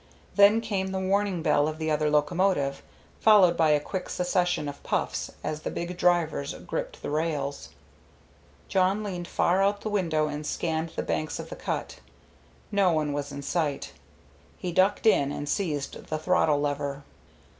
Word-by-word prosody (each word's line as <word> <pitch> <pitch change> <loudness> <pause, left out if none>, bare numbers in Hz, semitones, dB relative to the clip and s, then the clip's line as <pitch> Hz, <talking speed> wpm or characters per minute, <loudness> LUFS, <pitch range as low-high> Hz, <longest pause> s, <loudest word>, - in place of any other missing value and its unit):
Then 205 +2 +6
came 200 -4 -2
the 190 0 -2
warning 190 -2 0
bell 145 -3 +3
of 155 0 -4
the 160 0 -2
other 150 0 +1
locomotive, 150 -1 +1 0.4
followed 200 -6 +6
by 160 -2 +3
a 150 -1 +4
quick 180 +5 -5
succession 180 -3 0
of 145 0 -7
puffs - - -2
as 155 0 -3
the - - -3
big 175 +1 -4
drivers 175 - +1
gripped - - -5
the - - -3
rails. 150 -3 -2 1.0
Jawn 190 +3 +2
leaned 180 -4 -4
far 180 +3 +2
out 200 +1 +1
the 215 - -3
window 165 -7 +1
and 150 0 -4
scanned 160 +1 -2
the - - -2
banks 155 - -2
of - - -7
the - - -5
cut. - - -4 0.7
No 200 -3 +3
one 155 -2 0
was 145 0 -3
in 140 0 -6
sight. 150 -3 -2 0.6
He 180 - -4
ducked 190 +5 +2
in 140 -10 +4
and 145 - -5
seized 150 -6 -2
the 155 - -2
throttle 155 -3 +2
lever. 145 -1 -2
165 Hz, 165 wpm, -27 LUFS, 150-190 Hz, 1.0 s, Then